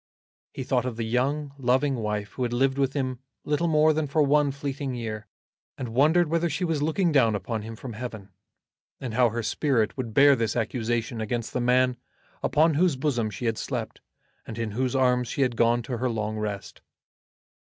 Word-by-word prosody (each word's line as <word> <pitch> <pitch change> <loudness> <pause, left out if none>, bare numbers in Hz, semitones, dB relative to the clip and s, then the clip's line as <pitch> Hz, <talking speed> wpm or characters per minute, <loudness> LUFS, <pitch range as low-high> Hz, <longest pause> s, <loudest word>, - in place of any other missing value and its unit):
He 130 - -5
thought 125 -1 0
of 120 -3 -5
the 115 - -2
young 135 +5 -1
loving 130 +3 +2
wife 105 -3 -3
who - - -8
had 120 -1 0
lived 135 +2 +1
with 135 -1 +1
him 130 -3 -2 0.3
little 150 +3 +1
more 155 -1 +4
than 155 -1 -1
for 150 +2 +2
one 145 0 +3
fleeting 140 -1 -4
year, 110 -2 -5 0.5
and 125 - -4
wondered 155 +7 +4
whether 170 +2 +1
she 165 +4 -1
was 160 -4 -1
looking 160 +3 +1
down 115 -7 +4
upon 110 +3 -3
him 110 +1 -7
from 120 +1 -8
Heaven, 110 -3 -7 0.7
and 125 -4 -5
how 125 0 +4
her 115 +1 -3
spirit 115 -3 +1
would 120 -5 -5
bear 140 0 +7
this 115 -3 -1
accusation 115 -1 -1
against 115 +1 -3
the 125 - 0
man 125 +1 +3 0.4
upon 160 +2 +3
whose 165 0 +3
bosom 130 -5 0
she 105 +4 -6
had 115 -1 0
slept, - - -4 0.5
and 115 - -7
in 115 -2 -2
whose 130 +4 -1
arms 125 -2 +2
she 135 - 0
had 125 -2 0
gone 120 +1 +2
to 125 +1 -4
her 125 +1 0
long 110 -2 -2
rest. 105 -2 -5
125 Hz, 195 wpm, -26 LUFS, 115-140 Hz, 0.7 s, bear